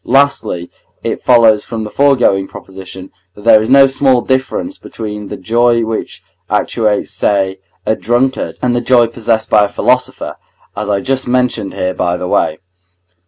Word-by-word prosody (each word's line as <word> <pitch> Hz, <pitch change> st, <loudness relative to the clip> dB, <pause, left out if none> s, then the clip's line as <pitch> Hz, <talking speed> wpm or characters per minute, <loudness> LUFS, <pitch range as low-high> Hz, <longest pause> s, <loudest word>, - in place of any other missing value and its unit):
Lastly, 135 Hz, -10 st, +1 dB, 0.3 s
it -, -, -3 dB
follows 115 Hz, -4 st, +4 dB
from 115 Hz, -1 st, -5 dB
the 105 Hz, -, -7 dB
foregoing 125 Hz, -8 st, +2 dB
proposition, 95 Hz, 0 st, -10 dB, 0.2 s
that 105 Hz, -, -13 dB
there 110 Hz, -1 st, +6 dB
is 110 Hz, -, -3 dB
no 135 Hz, +1 st, +7 dB
small 135 Hz, -2 st, +2 dB
difference 130 Hz, -, -2 dB
between 105 Hz, -2 st, -7 dB
the -, -, -7 dB
joy 115 Hz, +3 st, +2 dB
which 110 Hz, 0 st, -5 dB, 0.3 s
actuates, 105 Hz, -2 st, 0 dB
say, 95 Hz, -2 st, 0 dB, 0.3 s
a 110 Hz, -, +1 dB
drunkard, 125 Hz, +4 st, -1 dB
and 125 Hz, -1 st, +1 dB
the 120 Hz, -, 0 dB
joy 120 Hz, -2 st, +4 dB
possessed 115 Hz, -1 st, -2 dB
by 105 Hz, -1 st, +5 dB
a -, -, -5 dB
philosopher, -, -, -1 dB, 0.4 s
as 105 Hz, 0 st, -4 dB
I 100 Hz, -1 st, 0 dB
just 130 Hz, 0 st, -2 dB
mention 125 Hz, -5 st, 0 dB
here 90 Hz, 0 st, -2 dB
by 90 Hz, -1 st, -1 dB
the 90 Hz, -, -4 dB
way. 80 Hz, -, 0 dB
115 Hz, 165 wpm, -14 LUFS, 100-125 Hz, 0.4 s, no